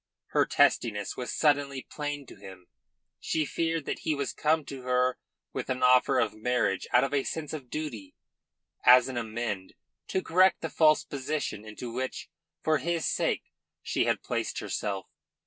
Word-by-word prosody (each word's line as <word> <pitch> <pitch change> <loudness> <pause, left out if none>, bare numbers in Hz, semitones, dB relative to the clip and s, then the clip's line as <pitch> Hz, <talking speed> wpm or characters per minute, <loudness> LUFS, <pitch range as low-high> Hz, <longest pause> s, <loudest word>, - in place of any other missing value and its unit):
Her - - +2
testiness 105 -3 +2
was 125 - -4
suddenly 145 -3 +1
plain 145 -1 -4
to - - -13
him. 95 -2 -12 0.5
She 155 -1 0
feared 165 -1 -1
that - - -3
he 155 - 0
was 140 -1 -2
come 155 0 +1
to 135 -2 -7
her 125 0 +1 0.3
with - - -4
an 130 0 -1
offer 125 +1 +5
of - - +1
marriage 110 -3 0
out 125 - +5
of 135 +1 -1
a 140 -2 +2
sense 160 -2 -4
of 140 -5 -7
duty, 115 -12 -5 0.7
as 125 0 +8
an 130 - -5
amende, 110 -4 -3 0.3
to 190 - -1
correct 185 +3 +4
the - - -4
false 155 -1 +4
position 140 -5 -3
into 110 +2 -7
which, 130 +1 -4 0.3
for 155 -1 +2
his 170 -1 -1
sake, - - -1 0.3
she - - 0
had - - 0
placed - - -2
herself. 100 -3 -3
130 Hz, 165 wpm, -29 LUFS, 120-150 Hz, 0.7 s, as